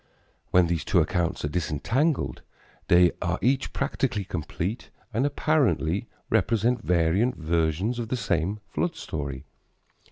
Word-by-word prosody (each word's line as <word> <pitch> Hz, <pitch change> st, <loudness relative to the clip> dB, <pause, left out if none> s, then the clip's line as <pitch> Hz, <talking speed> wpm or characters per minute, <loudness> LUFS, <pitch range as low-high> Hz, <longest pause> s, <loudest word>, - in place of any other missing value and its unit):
When 90 Hz, -1 st, +5 dB
these 85 Hz, -2 st, -1 dB
two -, -, +3 dB
accounts 85 Hz, -3 st, 0 dB
are -, -, +1 dB
disentangled, 80 Hz, -, 0 dB, 0.5 s
they 90 Hz, 0 st, +6 dB
are 85 Hz, +1 st, 0 dB
each 130 Hz, +2 st, +1 dB
practically 130 Hz, -6 st, -1 dB
complete 90 Hz, +5 st, -4 dB, 0.2 s
and 125 Hz, +6 st, +2 dB
apparently 135 Hz, -, +1 dB, 0.2 s
represent 115 Hz, +3 st, +2 dB
variant 90 Hz, +8 st, +2 dB
versions 85 Hz, +8 st, 0 dB
of 115 Hz, -, -3 dB
the 125 Hz, -, -1 dB
same 100 Hz, -1 st, 0 dB
flood 175 Hz, -1 st, -2 dB
story. 70 Hz, -, -5 dB
95 Hz, 125 wpm, -26 LUFS, 80-120 Hz, 0.5 s, they